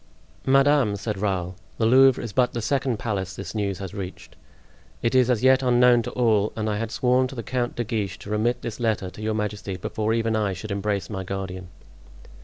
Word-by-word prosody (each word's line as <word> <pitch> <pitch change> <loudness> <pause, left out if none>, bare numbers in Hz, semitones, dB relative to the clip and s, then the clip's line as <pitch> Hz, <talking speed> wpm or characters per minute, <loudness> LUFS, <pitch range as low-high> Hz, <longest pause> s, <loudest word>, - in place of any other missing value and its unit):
"Madame," 135 -5 +4
said 105 0 -4
Raoul, 95 -3 -1 0.2
"the 115 - +1
Louvre 130 +2 +5
is 115 -4 -6
but 125 -1 +2
the 120 - -2
second 130 -1 0
palace 95 -5 -3
this 95 -2 -7
news 100 -3 -2
has 95 -1 -7
reached; 95 -3 -8 0.7
it 115 - +1
is 130 -1 +4
as 125 -2 +1
yet 130 0 +5
unknown 125 -1 +5
to - - -5
all, 110 -4 +2
and 110 -1 -2
I 105 -1 -1
had 115 0 -3
sworn 125 +2 +2
to 135 - -9
the 115 - -5
Count 120 0 -2
de 120 - -1
Guiche 105 -5 -3
to 105 - -8
remit 120 +3 0
this 120 0 -5
letter 110 -5 -1
to 105 - -11
your 110 0 -1
majesty 105 -3 -3
before 110 +4 -1
even 115 -1 0
I 105 -3 0
should 100 +3 -7
embrace 100 -2 -1
my 95 -3 -5
guardian." 95 -1 -5
110 Hz, 210 wpm, -24 LUFS, 100-120 Hz, 0.7 s, Louvre